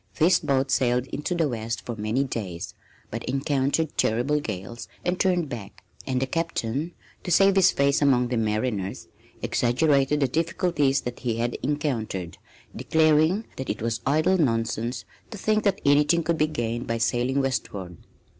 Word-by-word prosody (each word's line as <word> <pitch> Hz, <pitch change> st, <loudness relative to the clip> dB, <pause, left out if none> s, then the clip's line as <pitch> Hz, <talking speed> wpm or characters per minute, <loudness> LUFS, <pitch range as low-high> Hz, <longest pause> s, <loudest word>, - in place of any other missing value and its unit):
This 170 Hz, +3 st, +4 dB
boat 135 Hz, -3 st, 0 dB
sailed 125 Hz, -1 st, +2 dB
into 150 Hz, +5 st, -3 dB
the 165 Hz, -3 st, +2 dB
west 115 Hz, -4 st, -4 dB
for 120 Hz, -, -4 dB
many 110 Hz, +5 st, 0 dB
days, 100 Hz, -10 st, -5 dB, 0.4 s
but -, -, -4 dB
encountered 140 Hz, +3 st, 0 dB
terrible 125 Hz, +7 st, +2 dB
gales 110 Hz, -2 st, -6 dB, 0.2 s
and 180 Hz, +1 st, 0 dB
turned 180 Hz, -4 st, +2 dB
back; 115 Hz, -7 st, -8 dB, 0.2 s
and 130 Hz, -1 st, 0 dB
the 135 Hz, -, 0 dB
captain, 155 Hz, 0 st, -2 dB, 0.3 s
to -, -, -5 dB
save 195 Hz, +3 st, +5 dB
his 190 Hz, -1 st, +6 dB
face 140 Hz, +1 st, +2 dB
among 125 Hz, -4 st, +3 dB
the 125 Hz, -, -1 dB
mariners, 110 Hz, -2 st, -2 dB, 0.3 s
exaggerated 140 Hz, +3 st, +2 dB
the 135 Hz, -, +3 dB
difficulties 155 Hz, -2 st, +1 dB
that 120 Hz, 0 st, -6 dB
he 120 Hz, -2 st, -1 dB
had 120 Hz, +1 st, -1 dB
encountered, 125 Hz, -, -2 dB, 0.4 s
declaring 160 Hz, +6 st, +3 dB
that 130 Hz, -, -5 dB
it 105 Hz, -, -3 dB
was 115 Hz, -1 st, -1 dB
idle 155 Hz, +7 st, +2 dB
nonsense 115 Hz, -3 st, -1 dB, 0.2 s
to 220 Hz, -, -8 dB
think 215 Hz, +2 st, +1 dB
that 200 Hz, -1 st, +2 dB
anything 150 Hz, +4 st, +4 dB
could 165 Hz, 0 st, 0 dB
be 155 Hz, -, +3 dB
gained 120 Hz, -4 st, -3 dB
by 115 Hz, -, -1 dB
sailing 120 Hz, +4 st, +1 dB
westward. 100 Hz, -, -3 dB
135 Hz, 160 wpm, -25 LUFS, 115-155 Hz, 0.4 s, his